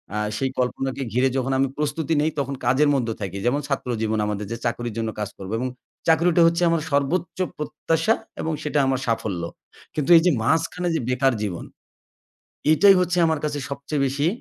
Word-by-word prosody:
আ - - -1 0.2
সেই 135 -1 0
কল্পনাকে 135 +2 -1
ঘিরে, 130 +2 +3
যখন 130 +1 -1
আমি 135 - +3
প্রস্তুতি 155 +2 -1
নেই 155 - +2
তখন 140 0 -2
কাজের 140 +4 +4
মধ্যে 115 -4 0
থাকি, 100 0 -4
যেমন 135 +4 +2
ছাত্র 135 -3 -2
জীবন 110 0 0
আমাদের 105 0 -3
যে 115 - -3
চাকরির 120 -1 -2
জন্য 115 -1 -1
কাজ 105 - -2
করবো 95 +2 -6
এবং 130 - -1 0.4
চাকরিটা 170 +1 +4
হচ্ছে 170 +1 +1
আমার 165 -2 +1
সর্বোচ্চ 160 +6 0 0.2
প্রত্যাশা 165 +6 0 0.3
এবং 160 0 -1
সেটা 150 -1 0
আমার 130 -1 +1
সাফল্য। 105 -6 -1 0.5
কিন্তু 150 +1 -1
এই - - +5
যে 180 - +5
মাঝখানে 165 +5 0
যে - - +1
বেকার 130 +1 +2
জীবন, 95 -5 -3 1.1
এটাই 195 +5 +7
হচ্ছে 180 0 0
আমার 160 -2 +1
কাছে 145 -1 -1
সবচেয়ে 140 +1 -2
বেশি 140 +3 0
140 Hz, 185 wpm, -23 LUFS, 120-160 Hz, 1.1 s, এটাই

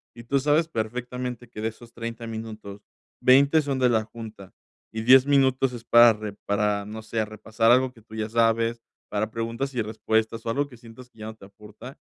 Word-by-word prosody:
y 120 - -11
tú 140 +3 +1
sabes 150 +4 +2
perfectamente 125 0 -4
que 105 - -8
de 110 - 0
esos 115 +1 -15
30 115 0 -6
minutos, 110 -3 -8 0.4
20 140 +4 +5
son 140 -2 -2
de 125 -1 +4
la 110 -2 +2
junta 110 -4 -11 0.4
y 110 - -3
10 130 +2 +7
minutos 135 -2 +3
es 120 - -8
para 120 -1 +7
re 105 -1 -7
para 100 0 0
no 110 +2 -7
sé, 110 0 -2
repasar 110 +2 0
algo 130 +1 +4
que 115 - -18
tú 110 - -17
ya 110 0 -3
sabes, 115 0 +1 0.3
para 105 +1 -2
preguntas 115 +4 -3
y 120 - +1
respuestas 110 +1 -1
o 115 - -2
algo 145 +4 0
que 125 -4 -15
sientas 120 +2 -14
que 115 - -24
ya 110 - -7
no 110 - -8
te 105 - -15
aporta, 105 +6 -13
115 Hz, 210 wpm, -25 LUFS, 110-125 Hz, 0.4 s, 10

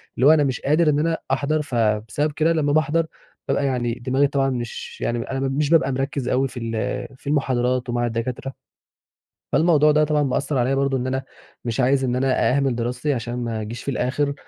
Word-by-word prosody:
اللي 130 - +2
هو 150 - +8
أنا 155 -2 +5
مش 130 -4 -1
قادر 155 +3 +3
إن 145 -1 +2
أنا 165 +1 +1
أحضر 145 +3 +1
فبسبب 115 +2 0
كده 160 +3 +2
لمّا 145 -3 +1
باحضر 155 +1 +2 0.4
بابقى 140 - +1
يعني 125 -3 0
دماغي 130 +4 +1
طبعًا 135 -1 +1
مش 120 -3 -5
يعني 120 0 -1
أنا 135 - -2
مش 135 +2 0
بابقى 155 -5 +4
مركّز 135 0 -2
أوي، 130 +2 +2
في 125 - -8
ال 115 -1 -3
في 140 - -15
المحاضرات 125 -3 0
ومع 120 0 0
الدكاترة، 120 +3 -3 1.0
فالموضوع 155 -2 +4
ده 150 0 +4
طبعًا 150 -1 +2
مأثّر 135 +1 -1
عليَّ 130 +2 +2
برضه 135 0 +1
إن 125 0 -3
أنا 130 +1 -2 0.4
مش 115 0 -2
عايز 135 +1 +3
إن 125 -1 0
أنا 130 +1 +2
أهمِل 135 -3 +1
دراستي، 125 +5 -1
عشان 120 -2 -4
ما 115 -2 -3
أجيش 110 +3 -6
في 140 - -2
الآخر، 140 +3 0
135 Hz, 200 wpm, -22 LUFS, 120-145 Hz, 1.0 s, هو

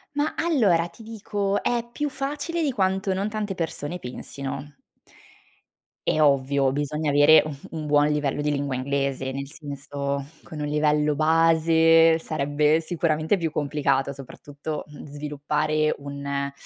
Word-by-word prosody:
Mah, 295 +1 0
allora 205 - +2
ti 225 - -16
dico, 205 -2 -2
è 235 -1 0
più 295 +4 -2
facile 290 +5 -3
di 285 - +1
quanto 190 -2 0
non 200 +3 -1
tante 210 -2 -3
persone 165 0 -4
pensino. 140 +2 -7 1.3
È 155 - +2
ovvio, 140 -2 +3
bisogna 145 +1 -1
avere, 145 +2 +7
un 150 -2 -5 0.2
un 155 -2 -5
buon 145 0 +4
livello 145 -1 0
di 150 0 0
lingua 140 -2 -2
inglese, 135 0 -1
nel 140 +1 -5
senso, 140 -2 -5 0.2
con 155 -3 -9
un 150 - -2
livello 150 0 +2
base 165 +1 +4
sarebbe 150 +1 +1
sicuramente, 160 +1 0
più 165 -3 -2
complicato, 140 -2 0
soprattutto, 145 +2 -7
mhmm, 150 - -11
sviluppare 150 +1 -1
un 140 0 -4
150 Hz, 135 wpm, -24 LUFS, 140-165 Hz, 1.3 s, avere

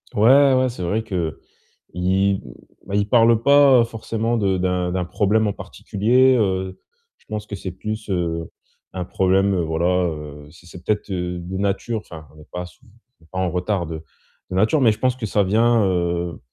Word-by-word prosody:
Ouais, 135 +6 +5
ouais, 130 0 +3
c'est 115 -6 -7
vrai 105 +6 -1
qu'il 105 -4 -4 0.8
m 95 +2 +1 0.5
ben, 100 - -4
il 100 0 +1
parle 115 -1 +4
pas, 140 0 +6
heu, - - +4
forcément 115 0 -3
de 95 -3 +1
d'un 90 -1 -1
d'un 90 0 -2
problème 105 +4 +1
en 100 - -1
particulier, 125 +9 +1
heu, 95 -3 -1 0.4
je - - -31
pense 105 -1 -4
que 105 - -5
c'est 95 -1 -6
plus, 110 +4 -6
heu, 85 -3 -2 0.4
un 90 -1 -4
problème, 95 +2 +2
heu, 90 - 0
voilà, 80 +1 -1 0.2
heu, 75 -2 -9
c'est 85 +2 -18
c'est 90 0 -12
peut-être, 105 +2 -1
heu, 90 -1 -3
de 90 +2 -6
nature, 100 +3 -1
enfin 80 -6 -12
on - - -20
n'est 75 - -14
pas 90 0 -5
souv 115 +7 -18 0.3
on - - -22
n'est - - -22
pas 95 - -7
en 95 -1 0
retard 90 +1 -1
de 80 -1 -7 0.5
de 90 - -5
nature, 110 +10 +2
mais 115 -4 +5
je 105 - -5
pense 130 -1 +1
que 125 -3 -5
ça 105 0 +1
vient, 115 +3 +3
heu, 85 -2 -1
95 Hz, 205 wpm, -21 LUFS, 90-110 Hz, 0.8 s, pas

